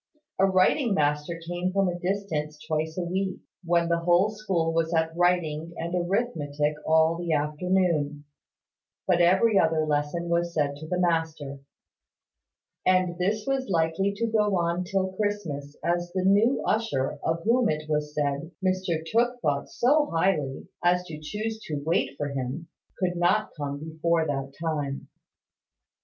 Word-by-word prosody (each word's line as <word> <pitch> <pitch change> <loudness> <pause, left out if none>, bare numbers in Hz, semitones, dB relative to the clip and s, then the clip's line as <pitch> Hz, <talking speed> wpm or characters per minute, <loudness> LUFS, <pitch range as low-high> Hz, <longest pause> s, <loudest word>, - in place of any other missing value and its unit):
A 195 - +5
writing 195 +5 +3
master 150 +2 0
came 175 +1 -1
from 195 0 +2
a 175 -1 -2
distance 175 -6 -2
twice 160 +1 -2
a 180 - 0
week, 185 +2 -2 0.3
when 170 0 +2
the 170 0 +1
whole 175 +4 +3
school 190 -7 -1
was 165 0 +1
at 160 0 +1
writing 170 -2 +1
and 170 +1 -4
arithmetic 175 -6 0
all 160 +1 +4
the 170 -1 -2
afternoon: 150 -1 0 0.8
but 175 -2 +3
every 190 +4 +5
other 160 -1 +2
lesson 150 +3 -1
was 170 0 0
said 145 -2 +1
to 155 +2 -9
the 180 +2 -1
master; 160 -5 -1 1.2
and 185 -1 +2
this 205 +4 0
was 270 -3 -1
likely 165 +3 +1
to 230 +3 -1
go 210 -3 +2
on 170 +1 0
till 190 0 -1
Christmas, 165 -9 -3
as 175 0 0
the 185 - +1
new 210 +7 +4
usher, 145 -10 0
of 165 +1 -1
whom, 235 +1 +3
it 155 0 -2
was 150 -1 -1
said, 145 +1 -1 0.2
Mr 185 -4 0
Tooke 240 +7 +1
thought 140 -1 0
so 295 +4 +3
highly 165 -6 0 0.2
as 180 +1 +3
to 160 -4 -8
choose 215 +7 -4
to 155 - -3
wait 160 -4 0
for 145 -1 -2
him, 140 +5 -4 0.3
could 180 -1 0
not 175 +5 +2
come 145 -2 -4
before 160 +1 0
that 135 -2 -3
time. 150 -4 -3
170 Hz, 155 wpm, -26 LUFS, 155-190 Hz, 1.2 s, A